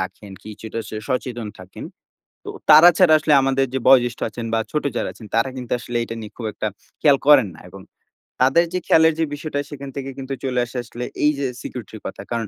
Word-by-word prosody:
রাখেন, 95 Hz, +2 st, -6 dB
কিছুটা 110 Hz, +1 st, -7 dB
স -, -, -10 dB, 0.2 s
সচেতন 120 Hz, -3 st, -3 dB
থাকেন। 95 Hz, 0 st, -10 dB, 0.6 s
তো -, -, -8 dB, 0.2 s
তারা 155 Hz, +3 st, +10 dB
ছাড়া 175 Hz, -4 st, +6 dB
আসলে 155 Hz, 0 st, 0 dB
আমাদের 135 Hz, 0 st, +2 dB
যে -, -, +1 dB
বয়োজ্যেষ্ঠ 120 Hz, -2 st, +4 dB
আছেন 115 Hz, -1 st, -6 dB
বা -, -, +2 dB
ছোট 150 Hz, -, -1 dB
যারা -, -, -1 dB
আছেন, 110 Hz, -, -13 dB
তারা 115 Hz, +3 st, +2 dB
কিন্তু 125 Hz, -2 st, -6 dB
আসলে 120 Hz, 0 st, -5 dB
এটা 115 Hz, -, -7 dB
নিয়ে 105 Hz, -1 st, -9 dB
খুব 115 Hz, -, -5 dB
একটা 110 Hz, -, -4 dB, 0.3 s
খেয়াল 145 Hz, -3 st, +5 dB
করেন 140 Hz, -8 st, +6 dB
না -, -, -15 dB
এবং 95 Hz, -, -11 dB, 0.6 s
তাদের 135 Hz, +7 st, +4 dB
যে 180 Hz, -, 0 dB
খেয়ালের 160 Hz, 0 st, +5 dB
যে 165 Hz, -, +2 dB
বিষয়টা, 145 Hz, -1 st, -4 dB
সেখান 140 Hz, -1 st, -8 dB
থেকে 135 Hz, -1 st, -5 dB
কিন্তু 135 Hz, 0 st, -5 dB
চলে 130 Hz, -2 st, -1 dB
আসে 120 Hz, +2 st, -9 dB
আসলে 120 Hz, +1 st, -8 dB, 0.2 s
এইযে 145 Hz, -2 st, +2 dB, 0.2 s
security 120 Hz, -3 st, -8 dB
র -, -, -16 dB
কথা। -, -, -8 dB
কারণ 115 Hz, -2 st, -2 dB
130 Hz, 210 wpm, -21 LUFS, 115-145 Hz, 0.6 s, তারা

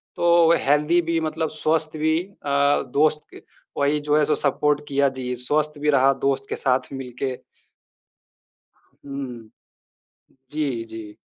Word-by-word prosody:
तो 170 Hz, -1 st, +4 dB, 0.2 s
हेल्दी 150 Hz, +4 st, +3 dB
भी 165 Hz, -1 st, +2 dB
मतलब 160 Hz, 0 st, -2 dB
स्वस्थ 155 Hz, 0 st, -1 dB
भी 160 Hz, +1 st, +2 dB
अ, 145 Hz, -7 st, 0 dB
दोस्त 150 Hz, +1 st, +2 dB
क -, -, -12 dB, 0.4 s
वही 145 Hz, +1 st, +2 dB
जो 150 Hz, 0 st, +3 dB
है 155 Hz, -, +4 dB
सो 155 Hz, -, +1 dB
सपोर्ट 145 Hz, +1 st, +1 dB
किया 140 Hz, 0 st, +2 dB
जी। 125 Hz, -1 st, -3 dB
स्वस्थ 150 Hz, +5 st, -1 dB
भी 150 Hz, +1 st, 0 dB
रहा 135 Hz, -1 st, +5 dB
दोस्त 135 Hz, 0 st, 0 dB
के -, -, -2 dB
साथ 130 Hz, -1 st, 0 dB
मिल 130 Hz, -2 st, -6 dB
के। 130 Hz, -2 st, -1 dB, 1.7 s
हुँ, 140 Hz, -1 st, -7 dB
हुँ। 115 Hz, -3 st, -10 dB, 1.0 s
जी, 140 Hz, -6 st, -2 dB
जी। 110 Hz, -2 st, -9 dB
145 Hz, 150 wpm, -23 LUFS, 135-155 Hz, 1.7 s, रहा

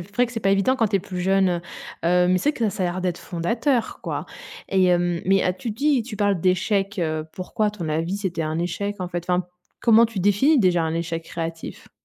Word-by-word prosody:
vrai 205 Hz, +8 st, 0 dB
que 240 Hz, -, -11 dB
c'est 225 Hz, -, -4 dB
pas 195 Hz, -, +2 dB
évident 195 Hz, +7 st, +2 dB
quand 225 Hz, -4 st, +2 dB
tu 200 Hz, -, +2 dB
es -, -, +1 dB
plus 185 Hz, -1 st, -6 dB
jeune, 190 Hz, +1 st, +3 dB
heu, 175 Hz, -1 st, -1 dB, 0.5 s
heu. 180 Hz, +1 st, +4 dB
Mais 185 Hz, -, +3 dB
c'est 295 Hz, +10 st, +1 dB
que 230 Hz, -6 st, 0 dB
ça 195 Hz, -, -3 dB
a -, -, +2 dB
l'air 175 Hz, +1 st, -3 dB
d'être 180 Hz, -2 st, -2 dB
fondateur, 230 Hz, -, -1 dB
quoi. -, -, -4 dB, 0.4 s
Et 190 Hz, -1 st, +3 dB
hem, 175 Hz, -1 st, +2 dB
mais 195 Hz, +1 st, +3 dB
ah 180 Hz, -, +1 dB
tu 225 Hz, +6 st, -5 dB
dis, 270 Hz, +3 st, +1 dB
tu 220 Hz, -2 st, -8 dB
parles 200 Hz, -3 st, +1 dB
d'échec, 195 Hz, +2 st, +1 dB
heu. 155 Hz, -2 st, -1 dB
Pourquoi 190 Hz, +3 st, -2 dB
à -, -, +1 dB
ton 185 Hz, -6 st, -6 dB
avis, 165 Hz, +5 st, -1 dB
c'était 180 Hz, -5 st, -2 dB
un 155 Hz, +1 st, -2 dB
échec, 200 Hz, +4 st, -3 dB
en 180 Hz, -, -3 dB
fait? 175 Hz, -1 st, -4 dB
Enfin, 180 Hz, 0 st, +1 dB, 0.3 s
comment 230 Hz, 0 st, +6 dB
tu 220 Hz, -3 st, -7 dB
définis 205 Hz, -, +3 dB
déjà 180 Hz, -6 st, +3 dB
un 160 Hz, 0 st, -1 dB
échec 165 Hz, 0 st, -3 dB
créatif? 165 Hz, 0 st, -6 dB
185 Hz, 240 wpm, -23 LUFS, 175-210 Hz, 0.5 s, comment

